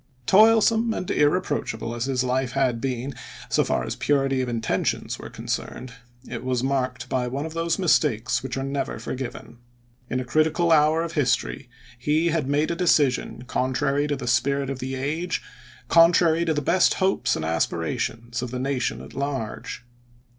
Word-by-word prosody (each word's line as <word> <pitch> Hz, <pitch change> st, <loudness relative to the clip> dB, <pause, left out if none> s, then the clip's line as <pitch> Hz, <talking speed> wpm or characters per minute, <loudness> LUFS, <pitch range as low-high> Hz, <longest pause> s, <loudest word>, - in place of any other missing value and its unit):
Toilsome 225 Hz, -, +5 dB
and 180 Hz, -, -3 dB
irreproachable 145 Hz, -8 st, 0 dB
as 120 Hz, +1 st, -2 dB
his 130 Hz, -2 st, 0 dB
life 130 Hz, 0 st, -1 dB
had 130 Hz, -4 st, +1 dB
been, 130 Hz, 0 st, -3 dB, 0.4 s
so -, -, +3 dB
far -, -, 0 dB
as -, -, -4 dB
purity 135 Hz, -2 st, +1 dB
of 125 Hz, -, -2 dB
intentions 115 Hz, -2 st, -1 dB
were -, -, -8 dB
concerned, 130 Hz, -1 st, -5 dB, 0.3 s
it -, -, -6 dB
was 125 Hz, -1 st, -1 dB
marked 130 Hz, -2 st, -1 dB
by 125 Hz, -1 st, -1 dB
one 135 Hz, +4 st, -3 dB
of 160 Hz, -, -6 dB
those 165 Hz, 0 st, 0 dB
mistakes 125 Hz, -, +2 dB
which 130 Hz, 0 st, -5 dB
are 135 Hz, -, -2 dB
never 135 Hz, 0 st, -3 dB
forgiven. 125 Hz, -2 st, -6 dB, 0.5 s
In 130 Hz, -, -1 dB
a 130 Hz, -, -4 dB
critical 155 Hz, +5 st, +2 dB
hour 155 Hz, +1 st, +4 dB
of 170 Hz, -, -4 dB
his 140 Hz, -6 st, +3 dB
tory 130 Hz, -, -8 dB, 0.3 s
he 155 Hz, +6 st, +1 dB
had 155 Hz, -4 st, 0 dB
made 145 Hz, +3 st, +1 dB
a -, -, -1 dB
decision 145 Hz, -8 st, +1 dB
contrary 140 Hz, +4 st, 0 dB
to 145 Hz, -, 0 dB
the 130 Hz, -2 st, -6 dB
spirit 135 Hz, +3 st, +1 dB
of 135 Hz, -, -5 dB
the 130 Hz, +1 st, -4 dB
age, 155 Hz, +7 st, -2 dB, 0.5 s
contrary 170 Hz, 0 st, +5 dB
to 160 Hz, -, +1 dB
the 150 Hz, -, -1 dB
best 180 Hz, +6 st, +3 dB
hopes 190 Hz, 0 st, +1 dB
and 80 Hz, -, -3 dB
aspirations 100 Hz, +8 st, -2 dB
of 125 Hz, -, -4 dB
the 125 Hz, -, -4 dB
nation 130 Hz, -1 st, -1 dB
at -, -, -12 dB
large. 135 Hz, -4 st, -4 dB
135 Hz, 175 wpm, -24 LUFS, 125-160 Hz, 0.5 s, Toilsome